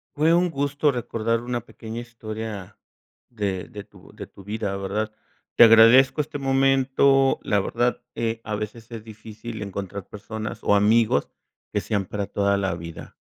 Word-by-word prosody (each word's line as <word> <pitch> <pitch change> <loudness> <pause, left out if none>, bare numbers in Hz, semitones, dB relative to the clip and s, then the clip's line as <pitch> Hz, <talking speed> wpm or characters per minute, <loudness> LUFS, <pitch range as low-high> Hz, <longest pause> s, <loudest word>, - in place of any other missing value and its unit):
Fue 155 +3 +3
un 175 +1 +3
gusto 145 0 0
recordar 115 -2 -2
una 120 -1 -3
pequeña 115 0 -8
historia 110 -4 -7 0.5
de 100 -5 -3
de 105 -1 -8
tu - - -18
de - - -9
tu 100 - -15
vida, 105 0 -3
¿verdad? 105 +3 -3 0.4
Te - - +8
agradezco 115 +6 +7
este 145 0 -6
momento, 135 0 +3
la 105 - +1
verdad, 120 +5 -1
eh, 115 0 -2
a 105 - -3
veces 105 +2 -7
es 115 -2 -7
difícil 110 0 -9
encontrar 100 -1 -6
personas 110 +1 -7
o - - +3
amigos 105 -5 +3 0.4
que - - 0
sean 100 -3 -1
para 100 +1 -3
toda 100 0 +1
la 95 -3 -1
vida. 85 -1 -9
110 Hz, 160 wpm, -24 LUFS, 105-120 Hz, 0.5 s, Te